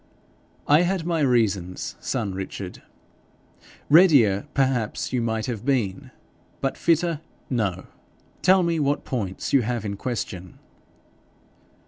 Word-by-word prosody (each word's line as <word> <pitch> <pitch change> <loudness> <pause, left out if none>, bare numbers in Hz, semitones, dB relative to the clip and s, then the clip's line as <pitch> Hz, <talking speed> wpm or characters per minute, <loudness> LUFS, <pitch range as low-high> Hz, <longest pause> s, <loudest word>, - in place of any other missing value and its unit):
'I 150 +3 +6
had 180 -1 0
my 170 -1 0
reasons, 105 - 0
son 110 -7 -2
Richard. 95 0 -6 1.1
Readier, 140 - +5
perhaps, 130 -6 0
you 125 - +1
might 110 -1 -1
have 120 -4 -4
been, 120 -9 -1 0.5
but - - -1
fitter 165 -1 +1 0.3
no. 100 -7 -1 0.6
Tell 185 0 +5
me 170 -1 0
what 145 0 0
points 100 -7 -3
you 135 - +6
have 120 -1 -2
in 100 -1 -3
question.' 95 -6 -5
125 Hz, 115 wpm, -24 LUFS, 100-150 Hz, 1.1 s, I